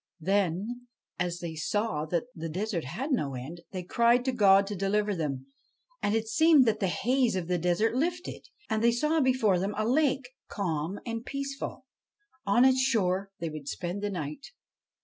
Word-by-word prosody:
Then, 200 +7 -1 0.3
as 175 -1 -1
they 170 -2 -4
saw 160 -1 -1
that 170 +1 0
the 165 -1 -6
forest 185 - -2
had 245 - -4
no 145 - 0
end, 150 +8 -7
they 185 -2 -5
cried 235 +6 +3
to 260 - +2
God 200 -4 +5
to 205 +1 -4
deliver 205 +2 0
them. 140 -6 -3 0.6
And 205 - +1
it 225 0 -1
seemed 305 +4 +5
that 220 -2 +1
the 195 - +1
haze 245 +4 +1
of 180 -3 -2
the 180 -1 0
desert 180 +7 +1
lifted, 340 +7 -2 0.2
and 220 0 -1
they 235 0 +5
saw 300 +6 +1
before 250 -8 +3
them 195 +3 -2
a 215 +1 0
lake, 270 -1 +2 0.2
calm 175 -1 -3
and 230 -1 -4
peaceful. 275 +1 -5 0.6
On 240 +6 +5
its 260 0 +4
shore 200 -7 +1
they 165 -3 -4
would 150 -2 -8
spend 180 +6 -4
the 205 - -1
night. 175 - -5
205 Hz, 180 wpm, -29 LUFS, 175-245 Hz, 0.6 s, God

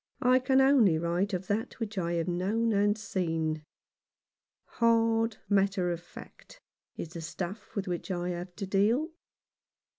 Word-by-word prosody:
I 255 +1 +5
can 265 +1 +3
only 255 - +5
write 170 +5 0
of 185 -1 -3
that 210 +5 -2
which 220 -2 -4
I 170 -3 -1
have 170 0 -1
known 205 +6 0
and 205 +1 +2
seen. 160 -6 -2 1.0
Hard 225 -1 +2
matter 195 -2 +2
of 170 -1 -4
fact 175 - -14 0.4
is 165 - -5
the 170 0 -7
stuff 180 +5 -6
with 200 -1 -2
which 175 +1 -4
I 175 -1 -2
have 175 0 -5
to 200 - -4
deal. 215 - +2
195 Hz, 150 wpm, -29 LUFS, 175-225 Hz, 1.0 s, I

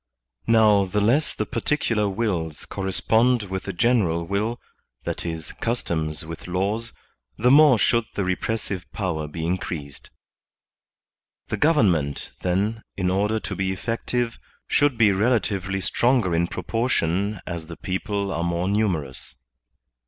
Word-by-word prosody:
Now, 105 -3 +5
the 105 +3 -1
less 125 +9 +2
the - - -1
particular 115 -8 0
wills 95 -7 -2
correspond 110 +5 +1
with 95 -1 -5
the - - -3
general 90 -7 +2
will, 105 +6 -1 0.4
that - - -3
is, 80 -1 -4
customs 80 - -2
with 80 +2 -8
laws, 100 +6 -1 0.5
the 125 +3 +3
more 145 -3 +7
should 115 +2 +2
the 100 - 0
repressive 95 0 -2
power 85 -7 -2
be 80 +2 -5
increased* 80 -5 -4 1.4
The - - -1
government, 95 - +2
then, 100 +5 0 0.2
in 90 -1 +1
order 105 +3 +1
to - - -4
be 95 -1 -1
eflEective, 115 +3 -2 0.3
should 145 -4 +2
be 110 -3 +5
relatively 100 -2 +1
stronger 120 -2 +2
in 85 +1 +2
proportion 100 -3 -1
as 85 -3 -5
the 85 - -9
people 100 +1 -2
are 85 - -1
more 85 +1 -1
numerous. 95 - -1
100 Hz, 130 wpm, -24 LUFS, 85-115 Hz, 1.4 s, more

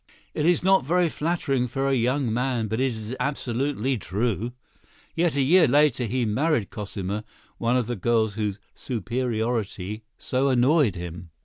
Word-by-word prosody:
It 150 - 0
is 175 0 +3
not 190 -3 +4
very 175 +4 +2
flattering 150 -6 -1
for 135 +3 -1
a 135 - +2
young 125 -1 +1
man, 120 -2 0
but 110 +4 -1
it 135 - +3
is 110 +1 -5
absolutely 130 -1 -1
true." 110 +3 -1 0.6
Yet, 170 -2 +1
a 140 - +2
year 165 +4 +5
later, 140 -2 +3
he 120 +2 0
married 130 +2 0
Cosima, 100 -1 -4 0.4
one 120 +2 +2
of 125 - +1
the 120 +2 -3
girls 110 +1 +1
whose 105 -1 -2
"superiority" 115 -3 -2 0.2
so 130 +2 0
annoyed 130 - +3
him. 85 -1 -7
125 Hz, 155 wpm, -25 LUFS, 110-140 Hz, 0.6 s, year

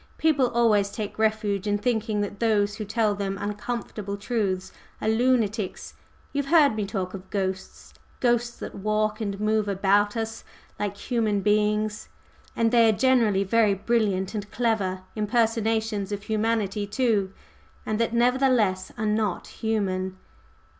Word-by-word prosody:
"People 290 -5 +3
always 220 -4 +3
take 210 +1 -6
refuge 215 -2 0
in 205 0 +2
thinking 220 -2 0
that 205 0 -4
those 210 -3 +2
who 215 - -4
tell 215 0 +1
them 195 -1 -3
uncomfortable 205 -1 -4
truths 200 -3 -2 0.3
are - - -3
lunatics. 220 -3 0 0.4
You've 285 -1 -1
heard 290 -6 +5
me 210 -2 -2
talk 190 -3 -3
of 190 -1 -9
ghosts? 190 -2 -4 0.3
ghosts 240 -1 +1
that - - -7
walk 215 +1 -1
and 200 -2 -3
move 215 0 +1
about 200 +2 +2
us 225 0 -4 0.4
like 205 -1 -2
human 215 -4 0
beings? 210 +1 +1 0.5
and 230 -1 +2
they 230 -2 +5
are 215 - +1
generally 235 -7 +3
very 210 0 +3
brilliant 200 -2 0
and 210 -1 -4
clever 205 -6 0
impersonations 220 -1 0
of 205 -1 -4
humanity, 215 -2 -1
too 210 -4 +1 0.5
and 215 0 -1
that 230 - +1
nevertheless 240 -5 +2
are 215 - -2
not 210 -3 0
human?" 190 -4 -2
215 Hz, 140 wpm, -25 LUFS, 200-230 Hz, 0.5 s, heard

